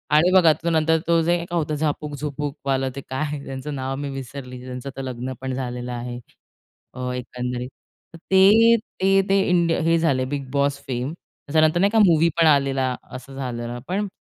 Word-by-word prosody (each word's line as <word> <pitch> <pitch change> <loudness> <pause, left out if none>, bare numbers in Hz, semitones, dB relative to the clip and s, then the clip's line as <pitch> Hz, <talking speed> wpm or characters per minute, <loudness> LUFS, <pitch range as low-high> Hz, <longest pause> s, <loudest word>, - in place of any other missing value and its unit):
आणि 170 +4 +5
बघा 180 -4 +6
तो 165 +3 -3
नंतर 160 0 +3
तो 170 -1 +4
जे 170 +2 +2
काय 175 - -1
होतं 155 -2 -1
झापक, 150 0 -2
झुपक 145 0 -4
वालं, 135 -1 +1
ते 140 - -5
काय 145 +2 -3
त्यांचं 135 +2 -5
नाव 135 0 -3
मी 140 +1 -4
विसरली. 130 -1 -7
त्यांचं 125 +1 -6
तर - - -3
लग्न 130 0 -5
पण 130 0 -3
झालेलं 125 -1 -4
आहे. 120 0 -5 0.7
अ, 125 0 -4
एकंदरीत. 125 0 -4 0.4
तर - - -10
ते, 210 +5 +7 0.5
ते 195 0 +4
इंडिया 170 -2 +2
हे 165 +1 +3
झाले 135 -6 +1
बिग 140 -2 -4
बॉस 140 0 +1
फेम, 130 +3 -3
त्याच्यानंतर 155 -1 0
नाही 200 +2 +4
का 225 - +3
मूव्ही 165 -2 +4
पण 165 - +6
आलेला, 135 -3 +2 0.2
असं 130 +1 -9
झालेलं, 120 -2 -4
पण 200 +3 -1
140 Hz, 180 wpm, -23 LUFS, 130-160 Hz, 0.7 s, ते